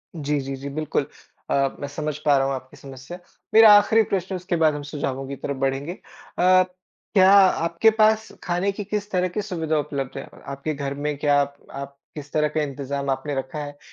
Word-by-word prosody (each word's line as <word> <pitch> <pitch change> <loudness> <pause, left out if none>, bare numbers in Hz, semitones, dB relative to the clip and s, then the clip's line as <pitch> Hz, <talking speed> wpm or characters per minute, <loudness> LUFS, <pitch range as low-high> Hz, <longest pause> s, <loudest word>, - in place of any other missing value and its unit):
जी, 150 -2 -1
जी, 135 0 -4
जी, 140 +1 -7
बिल्कुल। 155 +1 -2 0.4
अ, - - +1 0.3
मैं 145 - -4
समझ 150 0 -4
पा 145 -2 +5
रहा 135 - +2
हूँ 135 - -1
आपकी 130 0 -10
समस्या। 135 +6 -10 0.3
मेरा 220 -1 +9
आख़िरी 220 +2 +4
प्रश्न, 190 0 -1
उसके 180 0 -2
बाद 160 -2 +3
हम 145 - -5
सुझावों 135 -2 -4
की 140 - -5
तरफ़ 140 +1 -5
बढ़ेंगे। 135 +4 -1 0.5
अ, 185 +1 +6 0.5
क्या 190 -2 +6
आपके 185 0 +5
पास 220 0 +3
खाने 180 +2 0
की 200 +1 -6
किस 205 +1 -3
तरह 185 -1 +1
की 180 +4 -3
सुविधा 165 -6 -2
उपलब्ध 140 -3 -4
है? 135 - -6 0.2
आपके 140 +3 -4
घर 140 -1 -4
में 145 +1 -3
क्या 145 -1 +3
आप 140 0 -3 0.2
आप 140 0 -8 0.2
किस 145 -1 -8
तरह 150 0 +2
का 155 0 -1
इंतज़ाम 140 -1 -3
आपने 140 +2 -2
रखा 135 +2 -4
है 145 0 -8
150 Hz, 205 wpm, -23 LUFS, 140-180 Hz, 0.5 s, मेरा